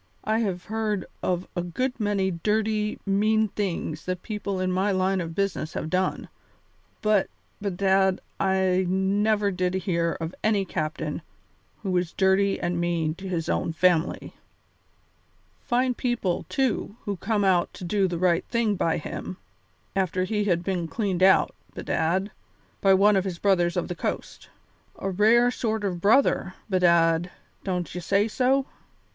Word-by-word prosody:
I 220 +1 +1
have 190 -5 -2
heard 215 -3 -2 0.2
of 180 0 -1
a 175 - 0
good 250 +10 -3
many 200 -3 +1
dirty, 210 +4 0
mean 215 +2 +2
things 175 -6 -3
that 185 -1 -3
people 210 -3 -3
in 185 0 0
my 190 +3 +1
line 190 0 +1
of 165 -1 -6
business 195 -5 -1
have 155 - -4
done, 185 0 0 0.8
but, 215 -2 +3 0.3
bedad, 190 -1 +2 0.2
I 190 -1 +2
never 200 +2 +2
did 180 0 -1
hear 170 -3 0
of 165 +1 -4
any 210 -3 +2
captain 155 -3 -3 0.6
who 195 - -2
was 180 -2 0
dirty 195 +1 +2
and 175 0 -1
mean 170 -2 0
to 190 +3 -9
his 165 -3 -2
own 165 - -1
family. 170 0 +1 1.3
Fine 250 +1 +2
people, 240 -8 -1
too, 255 -5 -1
who 200 -3 -2
came 205 +3 0
out 185 -3 +2
to - - -9
do 195 +2 +1
the 175 -1 -3
right 175 0 +2
thing 235 -3 +1
by 165 -4 0
him, 180 +3 -6 0.6
after 185 -1 0
he 210 +2 -1
had 175 -3 +1
been 180 -3 -2
cleaned 190 -1 -2
out, 190 0 +5 0.2
bedad, 185 +5 -1 0.5
by 195 -1 +5
one 205 +2 +5
of 190 - +2
his 185 -3 -4
'Brothers 175 -2 +2
of 175 - -1
the - - -3
Coast.' - - -5 0.5
A 195 - -3
rare 230 +5 +4
sort 220 -3 -2
of 180 -4 -2
brother, 205 -3 +3
bedad, 170 -3 +3 0.3
don't 180 -3 -3
you 180 - -4
say 200 +4 +2
so?" 260 +4 +2
190 Hz, 155 wpm, -25 LUFS, 175-210 Hz, 1.3 s, out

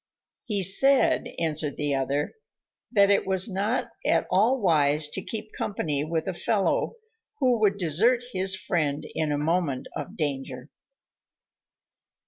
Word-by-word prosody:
"He 205 -6 +1
said," 270 +9 +3
answered 155 -3 -1
the 145 -1 -1
other, 135 +2 -1 0.6
"that 200 -1 +4
it 200 - +2
was 190 +1 +3
not 205 +4 -2
at - - +2
all 220 +8 +3
wise 150 -6 +2
to 190 - -4
keep 215 +2 -5
company 150 -8 -1
with 160 +2 -3
a 190 - -2
fellow 200 - 0 0.4
who 250 -4 +2
would 200 -2 +2
desert 205 - +2
his 190 0 +1
friend 155 -6 -2
in 155 -2 -1
a 145 - 0
moment 150 -3 -1
of 200 +4 -7
danger." 140 -3 -4
180 Hz, 135 wpm, -26 LUFS, 150-205 Hz, 0.6 s, that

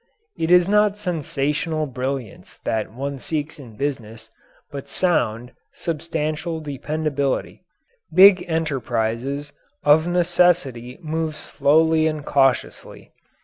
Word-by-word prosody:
It 160 - -2
is 180 0 +6
not 210 0 +3
sensational 155 -3 -2
brilliance 130 -4 -5
that 110 -1 -2
one 140 +3 -5
seeks 155 +3 -4
in 120 -6 -12
business, 115 -5 -5 0.4
but 140 -2 -7
sound, 125 -10 0 0.2
substantial 160 0 -3
dependability. 145 -1 -2 0.5
Big 190 -1 +7
enterprises 140 -2 -2 0.3
of 155 +3 +5
necessity 175 -8 +1
move 160 0 -2
slowly 160 +2 +2
and 155 -2 -3
cautiously. 135 -3 0
150 Hz, 100 wpm, -22 LUFS, 135-165 Hz, 0.5 s, Big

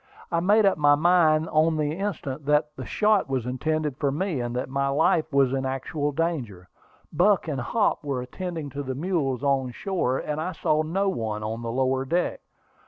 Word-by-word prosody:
I 170 - +2
made 205 +5 +4
up 195 -4 +2
my 145 -1 +5
mind 160 -1 +3
on 155 +1 +2
the 150 -1 0
instant 155 -7 -4
that 150 0 +2
the - - -7
shot 210 -6 +2
was 130 -3 -1
intended 150 +3 -2
for 140 -2 0
me, 165 0 -2
and 120 0 -4
that 125 - -2
my 140 +1 -1
life 155 +3 +2
was 135 -2 +3
in 135 -1 -1
actual 135 +3 -2
danger. 135 - -3 0.5
Buck 185 +3 +3
and 140 -5 -2
Hop 205 - 0
were 140 -3 -2
attending 160 +2 -6
to 145 - -4
the 130 -2 -4
mules 145 -5 -1
on 135 -2 +1
shore, 135 -2 -1
and 150 +1 -3
I 180 +3 -3
saw 155 -1 +1
no 185 +6 -1
one 110 - -2
on 110 +2 -4
the 115 -1 -4
lower 130 +1 +1
deck. 170 +6 -1
150 Hz, 195 wpm, -25 LUFS, 130-165 Hz, 0.5 s, my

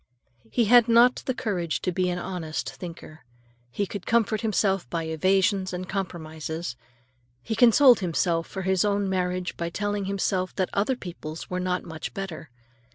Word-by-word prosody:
He 235 - +2
had 240 +2 +6
not 235 +2 +6
the 260 - +1
courage 180 - -2
to 185 - 0
be 180 +1 0
an 180 - -2
honest 175 -3 -4
thinker. 165 -3 -10 0.5
He 200 +11 -2
could 195 0 -7
comfort 225 -2 +2
himself 195 - +1
by 165 -1 -2
evasions 185 +4 +1
and 180 +1 -4
compromises. 160 - -4 0.7
He - - -3
consoled 245 +1 +6
himself 170 -2 0
for 190 - -5
his 190 -1 +2
own 205 -1 +1
marriage 180 -1 -1
by 170 0 -2
telling 205 +2 -2
himself 190 -1 -1
that 185 -2 -1
other 210 +6 +1
people's 170 -7 -8
were 180 - -1
not 180 0 -1
much 160 -1 -7
better. 175 -6 -6
185 Hz, 160 wpm, -26 LUFS, 170-205 Hz, 0.7 s, had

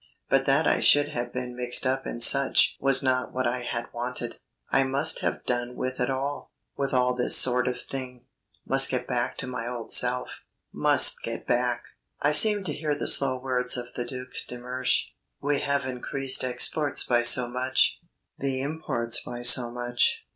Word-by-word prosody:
But - - +1
that - - +2
I - - +1
should 145 0 +3
have 120 -4 -5
been 125 -1 -6
mixed 125 +1 0
up 135 +1 -2
in 120 - -6
such 140 +3 +4
was 135 0 +3
not 130 -1 -1
what 130 0 -3
I 125 +1 -1
had 120 -1 -6
wanted. 120 0 -4 0.3
I 135 - +3
must 140 +4 +2
have - - -3
done 120 0 -3
with 130 0 -5
it 125 - -1
all; 135 +2 -5 0.2
with 140 -1 -3
all 125 -1 +1
this 125 0 +3
sort 125 0 +3
of 125 - -3
thing, 125 -2 -8 0.4
must 135 0 +5
get 125 -1 -3
back 125 0 -3
to - - -6
my 125 -2 -6
old 120 -2 -7
self, 125 0 +2 0.3
must - - +5
get - - -7
back. 120 0 -1 0.4
I 145 - +1
seemed 205 +6 +4
to 155 - -3
hear 150 -1 -3
the - - -5
slow 130 -2 +3
words 125 -1 0
of 120 0 -8
the 120 - -3
Duc 125 +1 -8 0.2
de 125 - -7
Mersch. 125 +1 -1 0.3
"We 145 0 -1
have 140 -1 -1
increased 130 +1 -1
exports 130 +4 0
by 120 -1 +1
so 120 +1 +5
much; 130 +2 0 0.4
the 135 -1 -3
imports 130 -5 -2
by 120 0 -8
so 120 0 +4
much. 120 0 -1
125 Hz, 185 wpm, -25 LUFS, 125-135 Hz, 0.4 s, must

